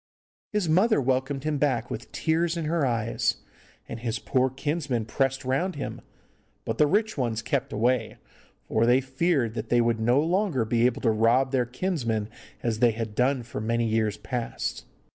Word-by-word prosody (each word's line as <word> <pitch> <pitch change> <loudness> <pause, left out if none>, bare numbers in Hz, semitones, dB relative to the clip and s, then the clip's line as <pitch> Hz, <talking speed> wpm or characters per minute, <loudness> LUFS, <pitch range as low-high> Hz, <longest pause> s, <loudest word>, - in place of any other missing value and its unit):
His 210 -4 0
mother 190 +7 +4
welcomed 135 +1 0
him 155 -2 -1
back 130 -6 0
with - - -6
tears 165 +1 0
in 165 - -2
her 155 -3 +1
eyes, 115 -2 0 0.5
and 115 - -6
his 115 -1 -2
poor 130 +4 +1
kinsmen 140 -3 -2
pressed 135 +3 -1
round 140 +9 0
him, 140 -2 -5 0.6
but - - -3
the 150 - +6
rich 210 0 +1
ones 115 -3 -1
kept - - -1
away, 115 +1 0 0.5
for 115 +1 +2
they 125 +2 +5
feared 130 -2 0
that - - -5
they 120 - +4
would 115 -1 +2
no 120 +4 +3
longer 165 - +1
be 115 +2 +3
able 125 - -2
to 115 - +3
rob 115 +5 +3
their 125 -3 +1
kinsman 120 - -2 0.3
as 115 -2 -1
they 120 -1 +4
had 110 -1 -4
done 125 +2 +1
for 115 - -6
many 115 +1 0
years 110 -2 0
past. 120 +2 -4
125 Hz, 180 wpm, -26 LUFS, 115-150 Hz, 0.6 s, the